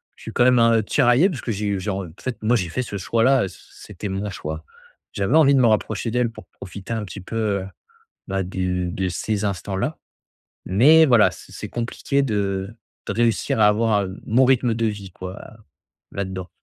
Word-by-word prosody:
je - - -17
suis - - -6
quand 120 - +3
même, 125 0 +5
heu, 115 -1 +4
tiraillé 130 - +3
parce 145 -8 -5
que 115 - -3
j'ai 105 0 -2
eu 100 -2 -1
j'ai 100 +2 -3
en 95 -2 -4
fait, 130 -3 -4
moi 115 +3 +2
j'ai 90 -6 0
fait 125 - -2
ce 105 -4 -5
choix-là, 115 +7 +2
heu, - - -1
c 90 - -13
c'était 105 0 -8
mon 100 +2 -3
choix. 80 -2 -6 0.5
J'avais 100 +9 0
envie 145 -3 +6
de 135 - +4
me 120 - +5
rapprocher 110 +1 0
d'elle 120 0 0
pour - - -13
profiter 100 +3 -8
un 110 -2 -3
petit 100 +1 -9
peu, 115 - -8 0.3
heu, 95 - -7 0.6
bah, 95 0 -1
de 90 -1 -2
de 95 +2 -2
ces 105 +4 -2
instants-là. 100 - -2 0.7
Mais 150 +12 +6
voilà, 110 -7 +5
c 90 - -14
c'est - - -7
compliqué 120 +4 -1
de 100 -5 -1 0.4
de - - -2
réussir 115 -1 +1
à 105 - +7
avoir, 105 -1 +2
heu, 95 +1 -8
mon 125 +4 +4
rythme 125 -3 +3
de 115 0 -1
vie, 100 -3 -4
quoi, 95 +2 -8 0.7
là-dedans. 95 -2 -5
105 Hz, 205 wpm, -22 LUFS, 95-120 Hz, 0.7 s, à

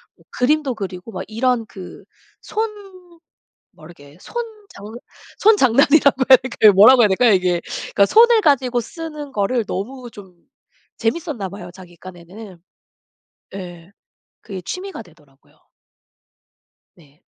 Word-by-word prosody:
뭐 - - -27
그림도 275 0 0
그리고 190 +1 -8
막 - - -6
이런 230 +1 -1
그 190 -6 -12 0.4
손 440 +1 -3 1.0
뭐 155 - -18
이렇게 150 -2 -16
손 - - -16 0.3
장 200 - -13 0.5
손장난이라고 280 - +3
해야 260 - +9
될까요 230 -4 +3
뭐라 215 +7 +7
해야 220 - +6
될까요 215 +4 +2
이게? 180 -2 +1 0.3
그러니까 200 - +4
손을 465 0 +5
가지고 260 - +1
쓰는 300 +1 -9
거를 220 +2 -1
너무 245 +7 -6
좀 190 -3 -15 0.6
재미있었나 245 - -3
봐요 200 -2 -10
자기 180 -2 -15
깐에는. 185 +2 -13 1.0
예. 175 -1 -10 0.5
그게 190 -2 -8
취미가 370 - -7
되더라고요. 150 -7 -23 1.4
네. 150 -2 -24
220 Hz, 270 characters per minute, -19 LUFS, 185-265 Hz, 1.4 s, 해야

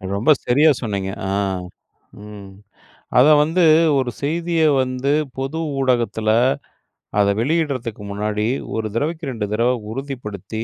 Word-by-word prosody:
ரொம்ப 110 +10 +3
சரியா 145 +6 +4
சொன்னீங்க. 100 -5 -3 0.2
ஆ, - - -2 0.9
ம். 105 -2 -10 0.7
அத 130 +4 +6
வந்து, 165 +4 +2 0.3
ஒரு 130 -2 -1
செய்திய 165 +3 0 0.2
வந்து, 130 +2 -1 0.3
பொது 135 +4 -3 0.2
ஊடகத்துல, 120 -4 0 0.9
அத 100 - +4
வெளியிடுறதுக்கு 130 -6 -1
முன்னாடி, 105 +1 -2 0.3
ஒரு 110 -1 -2
தடவைக்கு 155 +4 -2
2 110 -4 -3
தடவ 115 +3 +2 0.2
உறுதிப்படுத்தி, 110 -5 -6
125 Hz, 115 wpm, -20 LUFS, 105-145 Hz, 0.9 s, அத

